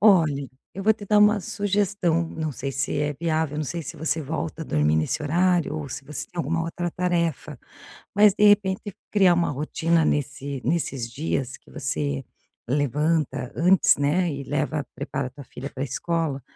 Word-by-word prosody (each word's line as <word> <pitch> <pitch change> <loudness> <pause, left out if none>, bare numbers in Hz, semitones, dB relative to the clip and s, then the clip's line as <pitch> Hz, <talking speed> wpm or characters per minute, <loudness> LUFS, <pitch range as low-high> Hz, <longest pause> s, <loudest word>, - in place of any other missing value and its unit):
Olhe, 160 -10 +4 0.2
eu 195 - -5
vou 220 +2 +5
te 205 -2 -10
dar 210 +1 +4
uma 210 0 +5
sugestão, 195 -4 0
não 155 -2 -3
sei 135 +1 -4
se 140 - -2
é 145 0 0
viável, 160 -3 0
não 155 - -1
sei 170 +4 -4
se 145 - -7
você 160 0 -1
volta 160 +2 -4
a - - -3
dormir 75 - +2
nesse 80 - 0
horário 175 +1 +2
ou 150 -2 -4
se 135 - -6
você 150 +1 -5
tem 180 - -21
alguma 165 0 0
outra 175 +1 -3
tarefa, 170 -4 -1 0.6
mas, 205 -1 +6
de 210 - +4
repente, 205 -1 +3 0.2
criar 195 -4 +5
uma 170 0 +1
rotina 160 +3 +1
nesse 140 -1 -1
nesses 135 -8 -1
dias 135 -1 -2
que - - -22
você 140 -1 -2 0.4
levanta 145 0 0
antes, 180 +3 +5
né, 160 +5 +1
e 140 -1 -4
leva 145 +1 -1
prepara 135 -1 -3
tua 140 +2 -11
filha 135 +2 -8
para 135 -1 -4
escola, 145 0 -2
160 Hz, 180 wpm, -25 LUFS, 140-180 Hz, 0.6 s, mas